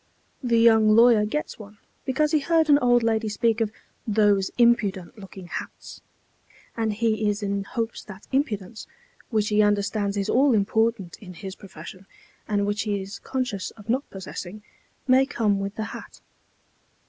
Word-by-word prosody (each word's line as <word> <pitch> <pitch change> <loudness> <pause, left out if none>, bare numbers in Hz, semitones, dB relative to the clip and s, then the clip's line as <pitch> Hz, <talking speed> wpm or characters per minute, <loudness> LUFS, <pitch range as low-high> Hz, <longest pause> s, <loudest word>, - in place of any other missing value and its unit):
The 240 -3 +1
young 225 -2 +5
lawyer 230 -2 +6
gets 300 +3 -4
one, 210 0 -12 0.3
because 295 +3 +1
he 310 - +3
heard 320 +1 +2
an 285 - +6
old 245 -2 +3
lady 225 -1 0
speak 225 +1 0
of 215 -2 0 0.4
"those 205 -2 +2
impudent 215 -5 +1
looking 190 -2 -11
hats," - - -8 0.7
and 225 -1 0
he 215 -1 0
is 205 +1 -2
in 200 0 -2
hopes 230 0 -4
that 205 -2 -11
impudence, 220 -7 -2 0.4
which 215 -3 0
he 210 0 +3
understands 205 0 0
is 200 0 -1
all 260 +2 +3
important 220 -2 0
in 180 -3 -11
his 190 +1 -7
profession, 185 +1 -12 0.4
and 205 -1 0
which 205 +1 -1
he 205 -2 -1
is 195 +1 -8
conscious 250 -8 -3
of 210 +1 -14
not 260 +4 0
possessing, 195 +1 -8 0.4
may 260 +1 +5
come 215 -7 0
with 195 +1 -4
the 220 - -3
hat. - - -10
215 Hz, 160 wpm, -24 LUFS, 200-235 Hz, 0.7 s, lawyer